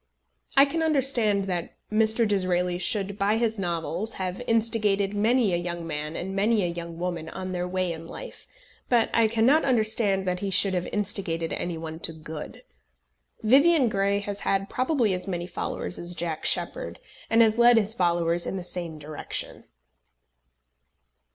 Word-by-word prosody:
I 275 - +8
can 325 +4 -2
understand 260 -10 +3
that 180 -3 -4 0.2
Mr. 220 +1 +3
Disraeli 180 -3 0
should 200 +1 -1
by 205 +2 +2
his 225 -2 -1
novels 175 +4 -3
have 185 +2 -4
instigated 215 -3 +1
many 220 0 +2
a - - +2
young 175 -1 -5
man 150 0 -4
and 190 +2 -5
many 210 +1 +2
a 175 -1 -1
young 170 -1 -7
woman 170 -2 -4
on 185 +1 -6
their 180 0 -2
way 185 -1 -1
in 165 0 -9
life, - - -10 0.4
but 235 -2 +2
I 230 -1 +4
cannot 230 +8 +3
understand 215 -6 +2
that 180 -1 -1
he 200 - -3
should 195 0 +3
have 180 -1 -2
instigated 190 -5 -1
any 175 -2 -3
one 160 0 -7
to 165 - -2
good. 155 -1 -9 0.8
Vivian 275 +3 +5
Grey 200 -1 +1
has 205 0 -5
had 195 0 -1
probably 255 -6 +1
as 180 +1 -2
many 175 -2 -3
followers 180 0 -4
as 175 +1 -4
Jack 165 -2 -4
Sheppard, - - +1 0.3
and 230 +1 +5
has 220 +1 +1
led 240 0 +6
his 215 0 +1
followers 170 -3 0
in 195 - -3
the 185 - -5
same 175 -3 -3
direction. 150 0 -7
195 Hz, 165 wpm, -26 LUFS, 175-225 Hz, 0.8 s, I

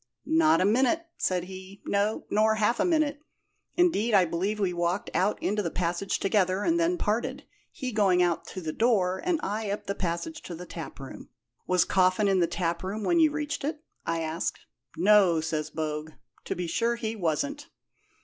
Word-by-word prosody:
'Not 160 0 +4
a - - +3
minute,' 260 +10 +2
said 180 -2 0
he; 190 +2 -10
'no, 205 +2 0
nor 220 +1 +3
half 220 +2 +1
a - - +3
minute. 310 -4 +1 0.5
Indeed, 240 - +3
I 190 -2 +6
believe 190 +6 -2
we 190 -3 +1
walked 175 +3 -1
out 200 +3 +1
into 210 +1 +1
the 175 - -2
passage 175 +3 -1
together, 195 -1 +1
and 335 0 +2
then 340 +2 +2
parted, 255 +4 -1 0.3
he 260 -6 -5
going 200 -5 +3
out 175 -2 0
to 185 - -7
the 155 -2 -4
door, 190 -6 +2
and 350 -3 +1
I 210 +1 -2
up 205 +1 -3
the 200 - -2
passage 195 - -3
to 175 - -6
the 180 +2 -8
taproom.' 155 -6 -9 0.4
'Was 180 -1 +3
Coffin 185 +2 +3
in 195 -1 +3
the 170 - +3
taproom 180 +4 -2
when 345 +6 +3
you 315 -1 +6
reached 300 -1 -3
it?' 300 +2 -3 0.2
I 165 0 -1
asked. 160 +2 -3 0.4
'No,' 190 -2 +5
says 155 -1 -2
Bogue; 155 0 -4 0.3
'to - - -2
be 180 - -3
sure 230 +7 0
he 225 -1 -3
wasn't.' 280 - -2
200 Hz, 185 wpm, -27 LUFS, 175-235 Hz, 0.5 s, I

